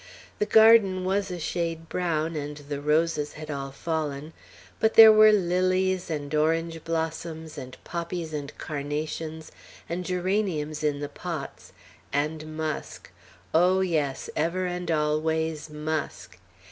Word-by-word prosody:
The 210 - +1
garden 220 -4 +6
was 195 +1 0
a 180 - -4
shade 165 0 -3
brown, 165 -2 -1
and 150 0 -4
the 145 -1 -6
roses 150 0 +1
had 155 0 -7
all 140 -1 -4
fallen; 155 0 -3 0.5
but 220 0 +2
there 220 -1 +11
were 215 0 +7
lilies, 185 -1 +1
and 150 -2 -4
orange 165 +1 0
blossoms, 160 -1 -4
and 130 0 -8
poppies, 170 -1 -4
and 145 -1 -4
carnations, 155 +2 -4 0.4
and 175 +2 -3
geraniums 180 -5 -1
in 145 -1 0
the 145 - -2
pots, 140 - -7 0.4
and 155 +2 -2
musk, 155 -2 -5 0.4
oh, 180 +3 +4
yes, 155 -7 -1
ever 170 +4 0
and 180 -1 -4
always 155 0 0
musk. 150 - -4
160 Hz, 130 wpm, -26 LUFS, 150-180 Hz, 0.5 s, there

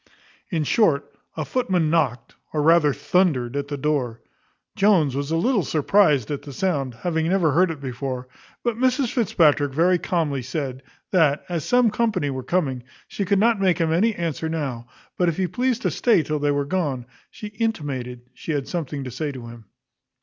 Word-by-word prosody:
In 165 -4 0
short, 145 -5 +2 0.2
a 155 - -2
footman 180 - 0
knocked, 125 -8 0 0.2
or 150 -1 0
rather 160 -2 +5
thundered, 140 -7 +1
at 140 0 -2
the 145 0 -4
door. 135 -5 -1 0.6
Jones 180 -10 +3
was 140 +1 -2
a 165 - 0
little 225 +5 +2
surprized 155 - +2
at 145 - -3
the 145 - -9
sound, 140 -7 -1
having 160 +4 -1
never 180 -5 +2
heard 180 +5 +3
it 160 -3 -5
before; 130 -1 -5 0.4
but 240 -2 0
Mrs 255 -1 +1
Fitzpatrick 150 - +3
very 175 +5 +3
calmly 155 -7 -1
said, 130 0 -4 0.3
that, 155 -6 +3
as 170 -4 -2
some 245 -3 +3
company 210 -10 0
were 130 -1 -4
coming, 135 -3 -1 0.3
she 200 - -3
could 200 +2 +2
not 220 0 +3
make 185 -4 +3
him 165 -2 +1
any 215 +6 +2
answer 160 -1 -3
now; 135 -7 -4 0.3
but 180 -1 +3
if 165 - -3
he 190 - +1
pleased 245 +6 -1
to - - +1
stay 225 -9 +3
till 150 +1 -2
they 145 0 +1
were 145 0 +1
gone, 140 -7 -2 0.2
she 210 - -8
intimated 145 - -3
she 160 - -5
had 140 -2 -2
something 150 -5 -4
to 130 - -6
say 145 +5 -3
to 130 -3 -9
him. 115 -1 -12
155 Hz, 185 wpm, -23 LUFS, 140-185 Hz, 0.6 s, rather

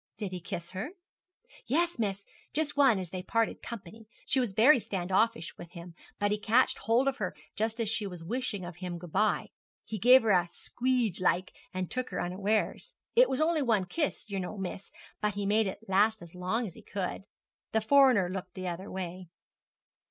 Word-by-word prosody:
'Did 205 -4 -4
he 180 - -4
kiss 170 0 -6
her?' 200 - -5 0.7
'Yes, 335 +3 +1
miss, 200 -2 -1 0.3
just 300 -1 0
one 270 -7 +5
as 180 -3 -5
they 185 - -4
parted 230 +4 0
company. 220 -1 -9 0.2
She 270 - +2
was 245 -5 0
very 250 +7 +6
stand 190 -4 -3
offish 225 -2 +1
with 175 -1 -10
him, 170 0 -9 0.2
but 205 0 +1
he 210 - 0
catched 225 +5 +3
hold 230 +5 +2
of 275 0 +1
her 185 -7 -3 0.2
just 220 +2 -1
as 230 - 0
she 210 -1 0
was 180 -3 -8
wishing 215 -1 -3
of 175 -1 -8
him 180 -1 -5
good 170 -1 -10
bye. 215 - +1 0.4
He 215 - -5
gave 250 +5 +7
her 220 - +3
a 175 -2 +4
squeedge 240 +1 -1
like, 185 +1 +1 0.2
and 185 -1 -4
took 255 0 -2
her - - -3
unawares. 200 +5 -1 0.2
It - - +6
was 260 - -1
only 315 0 +2
one 225 -8 +2
kiss, 295 - -2
yer 200 -2 -3
know, 185 +3 -5
miss, 190 0 -5 0.3
but 210 -1 0
he 205 0 -2
made 210 +1 +3
it 200 +4 -7
last 210 +2 +3
as 170 - -12
long 185 +7 -1
as 185 - -7
he - - -13
could. 195 0 -4 0.5
The 220 - +3
foreigner 255 -5 +5
looked 185 0 -6
the 185 -1 -4
other 185 +4 -6
way.' 185 -1 -6
205 Hz, 205 wpm, -30 LUFS, 185-235 Hz, 0.7 s, gave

